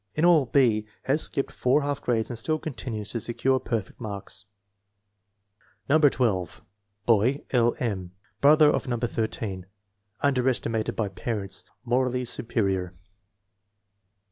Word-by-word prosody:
In 155 - +2
all, 160 -7 +5
B. 115 -6 +3 0.2
has 145 +4 +2
skipped 135 - -1
four 135 +4 +2
half 145 0 -2
grades 115 -1 0
and 120 - -4
still 155 +7 0
continues 120 -8 -5
to 115 - -3
secure 130 +3 +1
perfect 115 -3 -4
marks. 100 -2 -6 1.4
No. 155 +3 +4
12. 115 - +1 0.4
Boy: 120 +5 +3
L. 120 -2 +3
M. 95 -7 -3 0.3
Brother 150 +1 +7
of - - -2
No. 120 -1 -1
13. 110 -5 -3 0.5
Under 130 -2 +2
estimated 115 -3 -1
by 110 - 0
parents. 100 0 -5 0.2
Morally 125 +1 +1
superior. 95 -6 -1
120 Hz, 125 wpm, -26 LUFS, 110-135 Hz, 1.4 s, Brother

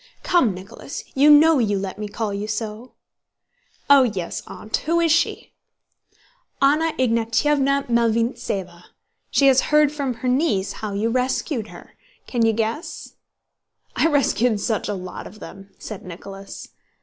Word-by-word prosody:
"Come, 255 - +2
Nicholas! 195 +9 -8
You 280 +3 +5
know 300 0 +7
you 205 -4 +1
let 195 +1 -5
me 210 - -4
call 210 0 -3
you 200 +1 -4
so?" 220 +2 -5 0.9
"Oh, 280 -1 +7
yes, 200 -9 -2
Aunt. 215 - -4
Who 335 +1 +2
is 335 -1 +2
she?" 335 +2 0 1.1
"Anna 305 +4 +3
Ignátyevna 270 +4 +1
Malvíntseva. 225 -6 -1 0.4
She 280 - +3
has 265 -1 +6
heard 300 -1 +4
from 280 -4 -3
her 230 +3 -5
niece 250 - +1
how 215 -2 -6
you 215 +3 0
rescued 255 -1 -1
her.... - - -14 0.3
Can 240 -2 -1
you 225 - +4
guess?" 225 +7 -4 0.8
"I - - +3
rescued 250 -7 +2
such 220 0 -2
a 205 - -1
lot 185 -1 -7
of 215 - -14
them!" 195 0 -11
said 215 -3 -8
Nicholas. 195 +2 -10
230 Hz, 145 wpm, -22 LUFS, 205-280 Hz, 1.1 s, know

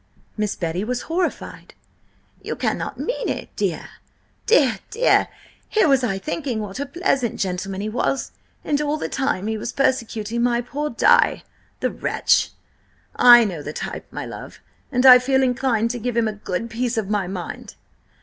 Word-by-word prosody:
Miss 210 -2 -2
Betty 170 +2 -3
was 245 +2 -3
horrified. 345 +2 -4 0.7
"You - - -4
cannot - - -3
mean - - -2
it! - - -5
Dear, - - -2 0.6
dear, 260 - +4
dear! 465 +4 +3 0.4
Here 430 -5 +3
was 270 -3 +3
I 195 -6 0
thinking 275 0 -3
what 205 +1 -6
a 280 - -3
pleasant 275 - -1
gentleman 190 +1 -3
he 210 - -3
was, 250 +4 -1 0.3
and 295 0 0
all 300 +1 -1
the - - -3
time 265 -8 -1
he 220 0 -2
was 230 - -4
persecuting 235 -4 -1
my 240 0 +2
poor 290 +5 -3
Di, 230 - +3 0.4
the - - 0
wretch! - - +1 0.7
I 240 -1 +8
know 175 -7 -4
the 150 +1 -6
type, - - -6
my - - -6
love, - - -9 0.3
and 250 0 +1
I 250 -1 +10
feel 265 +1 +2
inclined 245 -3 +1
to 245 - -5
give 240 +1 -3
him 230 -1 +2
a 215 - -2
good 210 +2 -4
piece 240 +1 -2
of 215 -3 -1
my 205 -3 0
mind!" 180 -2 -7
240 Hz, 170 wpm, -22 LUFS, 210-270 Hz, 0.7 s, I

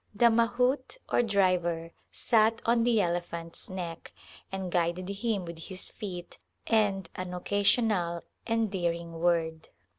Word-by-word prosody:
The 235 +2 +6
mahout 250 - +1
or - - +4
driver 180 -6 +1 0.2
sat 225 -1 +3
on 235 0 +3
the 235 -2 +3
elephant's 170 -2 -3
neck 175 -3 -6 0.4
and 190 -2 -4
guided 175 +1 0
him 200 -1 -1
with 170 -1 -8
his 190 -1 0
feet 180 -4 -7 0.3
and 205 -5 +2
an 180 -1 -5
occasional 200 -2 +1 0.2
endearing 175 -7 -1
word. 165 -2 0
185 Hz, 120 wpm, -29 LUFS, 170-225 Hz, 0.4 s, The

